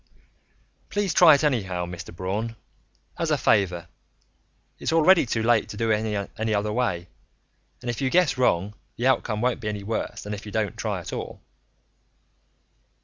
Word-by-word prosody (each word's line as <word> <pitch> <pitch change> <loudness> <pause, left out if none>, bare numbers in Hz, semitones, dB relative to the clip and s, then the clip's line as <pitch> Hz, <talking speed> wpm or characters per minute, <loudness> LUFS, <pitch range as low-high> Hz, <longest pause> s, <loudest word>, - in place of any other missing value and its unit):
"Please 205 -4 0
try 160 -3 +8
it 140 - -1
anyhow, 95 -11 0
Mr. 85 -2 -8
Braun 100 +6 -3 0.6
as - - 0
a - - +2
favor. 90 -4 +1 0.9
It's - - -2
already 165 -1 +5
too 115 0 -1
late 115 -1 +3
to 105 - -7
do 115 0 +1
it 105 -2 -1
any 110 -1 0
other 105 +1 -1
way. 95 -8 -1 0.8
And 120 - -3
if 120 - -6
you 130 - +1
guess 180 0 +3
wrong, 105 -6 +1 0.2
the 120 - -3
outcome 120 -4 +1
won't 125 0 +1
be 105 - -5
any 105 -1 -4
worse 110 +3 -3
than 105 - -5
if 105 - -6
you 105 - -8
don't 105 -2 -1
try - - -2
at - - -8
all." - - -5
110 Hz, 170 wpm, -25 LUFS, 100-125 Hz, 0.9 s, try